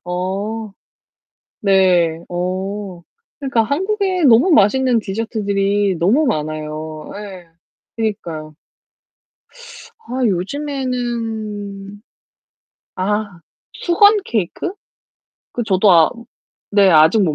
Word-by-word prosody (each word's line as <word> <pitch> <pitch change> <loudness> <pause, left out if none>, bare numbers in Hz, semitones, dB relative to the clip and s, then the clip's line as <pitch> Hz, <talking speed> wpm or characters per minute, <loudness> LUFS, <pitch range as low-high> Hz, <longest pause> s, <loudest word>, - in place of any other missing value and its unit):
어. 195 +5 -3 0.9
네. 185 -5 +3
어. 185 +1 -4 0.4
그니까 265 -5 +1
한국에 375 - -1
너무 250 +7 +5
맛있는 250 - +4
디저트들이 200 -2 -1
너무 225 - +3
많아요. 155 -3 -4
예. 190 -5 -9 0.5
그니까요. 170 -9 -4 1.5
아 260 - -4
요즘에는 220 -3 -3 0.9
아 205 -1 -2 0.4
수건 410 +4 +5
케이크? 220 - -2 0.8
그 240 - -2
저도 195 -1 +3
아 165 -2 +6 0.7
네 195 -2 +6
아직 160 +7 +5
못 160 -6 +1
205 Hz, 165 characters per minute, -18 LUFS, 180-235 Hz, 1.5 s, 아